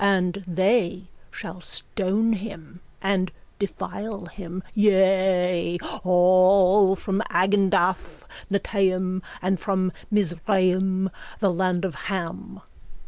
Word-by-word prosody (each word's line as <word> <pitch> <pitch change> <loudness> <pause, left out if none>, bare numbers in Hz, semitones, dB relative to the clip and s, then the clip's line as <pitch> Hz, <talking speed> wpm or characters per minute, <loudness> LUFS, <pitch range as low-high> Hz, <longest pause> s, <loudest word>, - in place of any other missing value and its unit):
And 195 -1 +1
they 185 0 +1 0.2
shall 180 +2 -8
stone 210 +5 -1
him 185 -5 -8 0.2
and 190 -2 0 0.3
defile 200 0 -5
him, 180 0 -8
yea, 190 -4 +2 0.3
all 185 +2 +5
from 195 +1 -2
Agendath 185 -3 +1 0.3
Netaim 185 -2 0 0.2
and 185 0 +1
from 190 -2 0 0.2
Mizraim, 190 -1 +1 0.3
the 195 -4 +2
land 185 +1 0
of 185 - -3 0.2
Ham. 180 -4 -5
190 Hz, 90 wpm, -24 LUFS, 180-195 Hz, 0.3 s, all